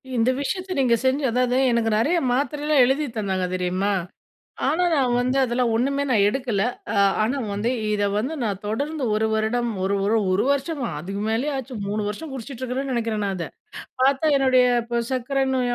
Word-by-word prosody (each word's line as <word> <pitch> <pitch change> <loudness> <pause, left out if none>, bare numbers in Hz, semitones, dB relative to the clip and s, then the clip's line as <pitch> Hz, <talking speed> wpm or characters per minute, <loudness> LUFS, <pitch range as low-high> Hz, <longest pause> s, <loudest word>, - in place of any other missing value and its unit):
இந்த 235 +1 +2
விஷயத்த 370 +5 -3
நீங்க 245 -3 +4
செஞ்சு 270 +2 +2
அதாவது 250 +1 +1
எனக்கு 230 -1 +1
நெறையா 310 +11 +2
மாத்திரைலாம் 290 +2 +1
எழுதி 275 +4 +1
தந்தாங்க 190 -4 -1
தெரியுமா? 185 +3 0 0.8
ஆனா 355 +3 +2
நான் 255 -4 +2
வந்து 250 +2 0
அதெல்லாம் 245 -1 +1
ஒண்ணுமே 275 +4 +1
நான் 205 -4 +4
எடுக்கல. 240 -5 -1 0.3
அ - - -2 0.3
ஆனா 235 +6 0 0.2
வந்து, 210 +4 -1 0.2
இத 205 -1 0
வந்து 260 +9 -1
நான் 200 -3 -2
தொடர்ந்து 285 +7 -2
1 220 +1 +1
வருடம், 235 +2 0
ஒரு 195 +1 +1
ஒரு 215 +3 +2 0.2
ஒரு 190 +5 +2
வருஷமா, 280 -3 -2
அதுக்கு 195 +4 -5
மேலயே 245 +7 0
ஆச்சு, 260 -1 -6
3 210 +1 -1
வருஷம் 280 +9 -6
குடிச்சிட்டு 260 0 -7
இருக்குறேன்னு 260 +2 -2
நெனைக்கிறேன் 225 -3 -1
நான் 195 - -1
அத. 170 - -4 0.6
பாத்தா 275 +3 +3
என்னுடைய, 260 -2 +4 0.2
இப்ப 235 0 -1
சர்க்கரை 265 +2 0
நோய் 245 -1 0
245 Hz, 175 wpm, -23 LUFS, 215-270 Hz, 0.8 s, நீங்க